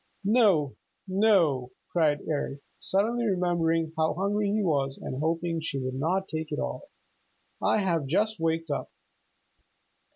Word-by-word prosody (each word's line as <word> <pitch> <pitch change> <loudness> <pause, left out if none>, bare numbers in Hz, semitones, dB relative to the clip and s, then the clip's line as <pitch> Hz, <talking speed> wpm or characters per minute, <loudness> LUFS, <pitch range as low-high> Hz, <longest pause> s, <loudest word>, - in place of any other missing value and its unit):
"No, 200 - +3 0.3
no," 185 - +2 0.2
cried 150 -4 +2
Eric, 145 -2 -2 0.2
suddenly 230 +5 +1
remembering 165 -4 +1
how 160 0 +1
hungry 200 +2 0
he 210 +1 +1
was 140 -6 0
and 130 - -5
hoping 165 +1 -1
she 155 -3 -3
would 130 -1 -3
not 175 +8 0
take 155 0 -4
it - - -2
all. 65 0 -4 0.7
"I - - +3
have 170 -8 0
just 210 +7 +1
waked 165 -1 -1
up." 145 - -3
165 Hz, 135 wpm, -28 LUFS, 150-195 Hz, 0.7 s, No